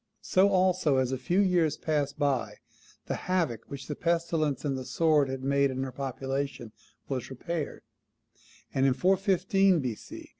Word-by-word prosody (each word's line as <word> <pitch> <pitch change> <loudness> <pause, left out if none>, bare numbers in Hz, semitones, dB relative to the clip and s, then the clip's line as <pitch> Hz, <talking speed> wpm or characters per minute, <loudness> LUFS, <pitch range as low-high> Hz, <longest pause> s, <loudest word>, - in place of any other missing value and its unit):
So 190 +2 +4
also, 185 -6 +2
as 130 -1 +1
a 130 - -1
few 175 +9 +1
years 175 -5 +2
passed 145 -3 -1
by, 140 -4 0 0.5
the - - -2 0.2
havoc 165 - 0
which 140 -1 -7
the 150 - -4
pestilence 165 -4 0
and 140 -2 0
the 130 - -4
sword 150 0 +2
had 130 0 -4
made 140 0 +2
in 130 0 -3
her 135 - -4
population 135 -2 -4 0.4
was 130 -3 -3
repaired; 155 +4 -5 0.9
and 135 +1 +3
in 130 - +2
415 195 0 +3
B.C. 125 -6 -6
145 Hz, 155 wpm, -28 LUFS, 135-175 Hz, 0.9 s, So